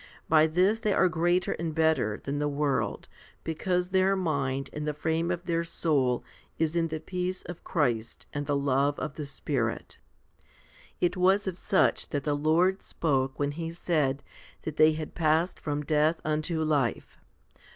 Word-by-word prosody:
By 155 0 +5
this 185 +7 +2
they 215 -3 +1
are 185 - +4
greater 175 +2 +1
and 160 -1 -3
better 160 -10 +2
than 140 +1 -2
the 150 - +1
world, 145 -1 -1 0.4
because 180 +3 -1
their 190 +1 +3
mind 140 -7 -1
and 150 0 -4
the 150 - -1
frame 160 +3 -1
of 175 0 -3
their 170 -1 0
soul 140 -7 0 0.3
is 160 0 0
in 165 -1 +2
the 160 -1 -4
peace 180 +3 -3
of 175 -1 -9
Christ 120 -9 -1
and 145 -1 -3
the 145 - +1
love 140 +1 +1
of 155 - -4
the 150 -2 -6
Spirit. 130 -4 -3 1.0
It 175 - +1
was 190 +2 +3
of 190 -3 -2
such 190 +1 +1
that 145 -2 -2
the 150 - 0
Lord 165 +6 +2
spoke 135 -4 -1
when 145 0 0
He 165 +2 -4
said 155 -5 0 0.4
that 155 -1 -5
they 155 0 +6
had 155 0 -5
passed 160 +2 +1
from 150 -1 -3
death 155 +2 +2
unto 155 +1 0
life. 145 -6 -1
155 Hz, 170 wpm, -28 LUFS, 145-175 Hz, 1.0 s, they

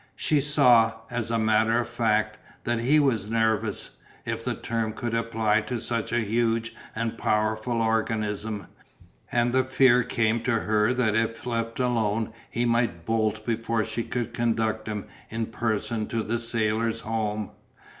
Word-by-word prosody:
She 150 -2 +2
saw, 125 -6 +5 0.2
as 120 -2 -2
a 115 - +1
matter 110 +1 +3
of 120 - -2
fact, 110 -2 0 0.2
that 120 -1 0
he 135 +6 +4
was 115 -8 +1
nervous, 110 -2 0 0.3
if - - -3
the - - -1
term 115 -1 -2
could 120 +1 -4
apply 110 -2 +1
to 125 -2 -2
such 115 0 -2
a 120 0 +2
huge 115 +1 0 0.2
and 115 0 -3
powerful 110 +2 0
organism, 110 -2 -1 0.7
and 120 0 +2
the 130 0 +4
fear 130 -1 +4
came 115 -1 +1
to 115 -1 +1
her 105 +1 +2
that 125 -4 +1
if 115 0 -1
left 115 -1 -2
alone 115 -3 0 0.2
he 120 - -1
might 115 -8 0
bolt 110 -1 0
before 115 -1 0
she 115 - -3
could 120 0 -3
conduct 110 -2 0
him 105 -2 -3 0.2
in 115 0 -2
person 110 0 -2
to 115 -1 -2
the 115 +2 -1
Sailors' 115 -1 0
Home. 110 -2 -2
115 Hz, 155 wpm, -26 LUFS, 110-120 Hz, 0.7 s, saw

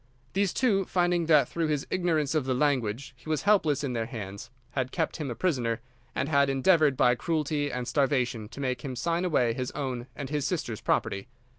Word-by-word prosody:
These 195 0 +2
two, 200 -7 +2
finding 175 -2 +1
that 150 -6 +5
through 165 -1 -1
his 150 -2 -1
ignorance 160 -5 +1
of 155 -4 +1
the 130 -1 0
language 130 -3 0
he 125 +5 -12
was 155 - 0
helpless 160 -9 +3
in 135 -3 -2
their 115 -2 -2
hands, 100 -5 -7 0.2
had 130 -2 -2
kept 160 -2 -1
him 150 -4 -3
a 120 - -4
prisoner, 120 -10 0 0.4
and 140 - 0
had 140 -2 +3
endeavoured 145 0 +4
by 125 - +5
cruelty 145 +2 -1
and 125 -1 -3
starvation 125 -7 0
to 140 - -10
make 130 -3 -1
him 130 -2 -4
sign 170 +7 0
away 125 -9 +2
his 125 +1 -3
own 130 -4 -3
and 140 -1 -6
his 145 -2 0
sister's 120 - -3
property. 100 -1 0
140 Hz, 200 wpm, -28 LUFS, 125-160 Hz, 0.4 s, that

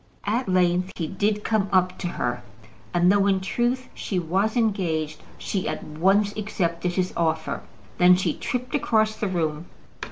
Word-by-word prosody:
At 220 +2 0
length 180 0 +2
he 165 - -2
did 205 +5 -1
come 210 -3 +1
up 185 -1 +3
to 180 - -2
her, 120 -7 -2 0.5
and 175 +1 +4
though, 200 0 +3
in 195 -1 +3
truth, 240 +6 -1
she 190 - -3
was 190 +7 0
engaged, 165 -9 0 0.2
she 190 -3 -2
at - - -4
once 195 +7 +2
accepted 180 -4 -2
his 185 0 -1
offer. 160 -1 -1 0.4
Then 180 0 +7
she 185 - 0
tripped 250 0 -4
across 220 -6 +2
the 215 - -2
room. 165 -3 -2
190 Hz, 160 wpm, -24 LUFS, 175-210 Hz, 0.5 s, Then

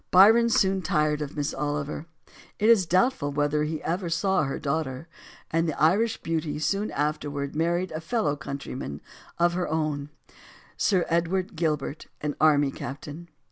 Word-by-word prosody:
Byron 225 +6 +7
soon 190 -3 +2
tired 150 -2 +1
of 150 0 -5
Miss 145 -1 -1
Oliver 145 +2 -3 0.5
it 215 - +3
is 205 -7 +5
doubtful 185 - +2
whether 145 +1 +1
he 155 0 -4
ever 175 +1 -2
saw 190 0 +1
her 135 - -3
daughter 140 -1 -3 0.4
and 165 0 +1
the 155 - -4
Irish 200 +9 +2
beauty 160 -2 -2
soon 195 +7 0
afterward 145 -1 -2
married 175 +3 0
a 155 - -4
fellow 165 -5 0
countryman 140 - -6 0.4
of 175 0 +3
her 180 0 -1
own 155 -2 -2 0.7
Sir 185 -4 +2
Edward 180 +4 0
Gilbert, 155 -2 -2
an 150 -1 -3
army 145 -3 +4
captain. 145 +7 -8
155 Hz, 150 wpm, -26 LUFS, 145-180 Hz, 0.7 s, Byron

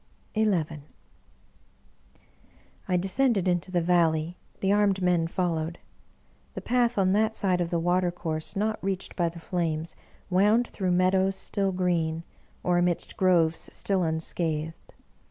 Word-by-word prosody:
XI 220 0 +2 2.4
I 180 -1 +2
DESCENDED 195 +2 +1
luto 180 0 0
the 175 -1 +1
Valley; 165 -1 +2 0.2
the 195 - +1
armed 205 -2 +3
men 175 -2 +2
followed. 165 -2 -2 0.8
The - - -4
path, 240 -1 +1
on 190 -1 +3
that 220 +1 +2
side 185 -3 +1
of 170 - -1
the 170 - 0
water 175 +2 +1
course 160 -3 -4
not 215 +1 -1
reached 195 -1 -3
by 170 -2 +1
the 170 - -12
flames, 165 -2 -2 0.3
wound 210 +6 +3
through 185 -3 -1
meadows 190 +1 +2
still 195 0 -1
green, 170 -3 0 0.4
or 175 -1 +2
amidst 175 -1 0
groves 170 -4 +2
still 195 -2 -1
unscathed. 160 -1 -3
180 Hz, 135 wpm, -27 LUFS, 165-195 Hz, 2.4 s, armed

